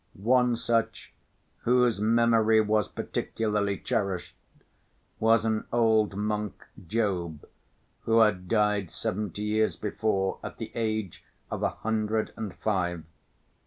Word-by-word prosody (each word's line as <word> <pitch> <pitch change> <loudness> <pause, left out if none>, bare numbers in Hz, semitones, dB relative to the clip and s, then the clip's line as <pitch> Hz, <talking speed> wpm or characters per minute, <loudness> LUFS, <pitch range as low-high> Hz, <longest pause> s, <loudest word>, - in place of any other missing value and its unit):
One 125 +4 +3
such, 115 -1 -1 0.5
whose 125 -3 +2
memory 115 0 +4
was 105 0 +2
particularly 105 -3 -2
cherished, 95 -4 -2 0.8
was 115 0 +4
an 110 -1 0
old 110 -4 +3
monk, 105 -1 -3 0.2
Job, 90 -7 -1 0.6
who 115 0 +3
had 95 -4 +2
died 105 -4 +1
seventy 105 +3 -3
years 110 +1 +1
before 105 -2 -1
at - - -7
the - - -6
age 110 -5 -2 0.3
of - - -3
a - - +2
hundred 110 0 -2
and 105 -4 -6
five. 90 -6 -1
110 Hz, 115 wpm, -28 LUFS, 100-115 Hz, 0.8 s, memory